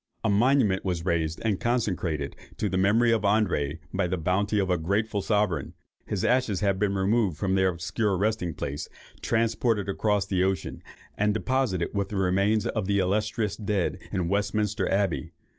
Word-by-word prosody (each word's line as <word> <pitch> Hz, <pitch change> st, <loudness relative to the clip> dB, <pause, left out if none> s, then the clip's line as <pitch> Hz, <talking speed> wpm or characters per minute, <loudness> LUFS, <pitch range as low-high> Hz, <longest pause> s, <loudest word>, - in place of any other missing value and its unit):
A 110 Hz, -, +2 dB
monument 110 Hz, -2 st, +3 dB
was 90 Hz, -3 st, -2 dB
raised 80 Hz, -3 st, 0 dB
and 105 Hz, -4 st, +1 dB
consecrated 90 Hz, -, -1 dB, 0.2 s
to 105 Hz, -, 0 dB
the 95 Hz, -, -2 dB
memory 110 Hz, +6 st, +3 dB
of 115 Hz, -2 st, +2 dB
André 100 Hz, -8 st, +1 dB, 0.2 s
by 95 Hz, -1 st, +1 dB
the 90 Hz, +1 st, -1 dB
bounty 100 Hz, +5 st, 0 dB
of 95 Hz, -2 st, +1 dB
a 90 Hz, -, +3 dB
grateful 100 Hz, +5 st, 0 dB
sovereign. 105 Hz, -9 st, 0 dB, 0.3 s
His 100 Hz, -3 st, -1 dB
ashes 120 Hz, -6 st, +1 dB
have 100 Hz, -2 st, +1 dB
been 100 Hz, -1 st, +1 dB
removed 95 Hz, -3 st, +1 dB
from 95 Hz, +2 st, 0 dB
their 95 Hz, 0 st, +3 dB
obscure 95 Hz, +3 st, -1 dB
resting 100 Hz, -5 st, -1 dB
place, 70 Hz, +1 st, -4 dB, 0.3 s
transported 115 Hz, -2 st, +1 dB
across 100 Hz, 0 st, +1 dB
the 95 Hz, -2 st, 0 dB
ocean, 95 Hz, 0 st, -2 dB, 0.3 s
and 105 Hz, 0 st, +1 dB
deposited 120 Hz, -7 st, 0 dB
with 100 Hz, -1 st, -1 dB
the 105 Hz, -, -4 dB
remains 100 Hz, +3 st, +2 dB
of 105 Hz, -4 st, -2 dB
the 100 Hz, 0 st, +2 dB
illustrious 105 Hz, +2 st, 0 dB
dead 105 Hz, -3 st, -1 dB
in 90 Hz, -3 st, -1 dB
Westminster 100 Hz, +1 st, 0 dB
Abbey. 95 Hz, -4 st, 0 dB
100 Hz, 170 wpm, -27 LUFS, 90-110 Hz, 0.3 s, monument